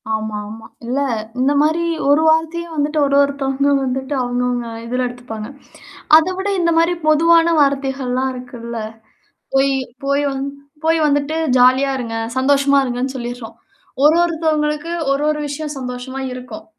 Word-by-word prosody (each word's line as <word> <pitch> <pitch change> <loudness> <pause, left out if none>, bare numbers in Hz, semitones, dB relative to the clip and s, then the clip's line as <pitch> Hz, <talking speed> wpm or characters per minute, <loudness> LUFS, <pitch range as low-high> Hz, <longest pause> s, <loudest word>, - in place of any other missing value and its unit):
ஆமா, 220 -1 -4
ஆமா. 220 +1 -10 0.2
இல்ல 250 +4 -1 0.4
இந்தமாரி 295 +5 +2 0.3
ஒரு 290 +2 +5
வார்த்தையே 325 +2 +1
வந்துட்டு 300 +1 0
ஒரு 280 0 +1
ஒருத்தவுங்க 280 0 0
வந்துட்டு 265 +2 -3
அவுங்கவுங்க 245 -1 -1 0.2
இதுல 250 +2 -1
எடுத்துப்பாங்க. 245 -3 -7 0.7
அதவிட 370 +4 0
இந்தமாரி 335 0 +2
பொதுவான 335 +2 +4
வார்த்தைகள்லாம் 265 -2 0
இருக்குல்ல. 240 -2 -8 0.8
"போய், 270 0 +3 0.3
போய் 280 +1 +1
வந் 270 0 -3 0.4
போய் 325 0 +3
வந்துட்டு 290 +1 0 0.2
ஜாலியா 260 +2 +4
இருங்க. 230 -2 -4 0.2
சந்தோஷமா 280 +1 +3
இருங்கன்னு" 255 +2 -3
சொல்லிர்றோம். 240 -1 -7 0.5
ஒரு 305 +2 +6
ஒருத்தவுங்களுக்கு 315 -1 -1 0.2
ஒரு, 275 +1 0
ஒரு 305 0 -1
விஷயம் 295 +1 -5
சந்தோஷமா 255 +1 -6
இருக்கும். 250 -3 -9
275 Hz, 125 wpm, -18 LUFS, 250-305 Hz, 0.8 s, ஒரு